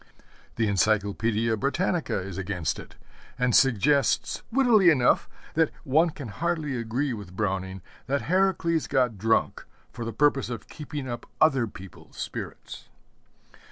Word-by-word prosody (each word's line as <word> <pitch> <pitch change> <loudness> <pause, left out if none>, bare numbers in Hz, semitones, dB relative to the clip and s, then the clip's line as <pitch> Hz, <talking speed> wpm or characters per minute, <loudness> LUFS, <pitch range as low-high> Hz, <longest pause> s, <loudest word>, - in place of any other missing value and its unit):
The 115 - +1
Encyclopædia 110 +2 +1
Britannica 170 - 0
is 95 0 -6
against 90 -3 -2
it, - - -12 0.4
and 125 -2 +2
suggests, 135 +3 +3
wittily 230 -7 +5
enough, 130 -7 +3 0.2
that 160 -1 +3
one 155 +6 +3
can 145 -6 -8
hardly 160 +2 -2
agree 120 +4 -1
with 100 -5 -9
Browning 95 -2 -2 0.2
that 140 +1 0
Heracles 170 -3 +1
got 125 -7 +1
drunk 115 +2 +1 0.3
for 120 - -6
the 115 - -3
purpose 140 -1 +2
of 120 -4 -6
keeping 150 -3 -6
up 120 -1 -6
other 135 -7 +4
people's 95 -3 -13
spirits. - - -7
125 Hz, 130 wpm, -26 LUFS, 105-150 Hz, 0.4 s, wittily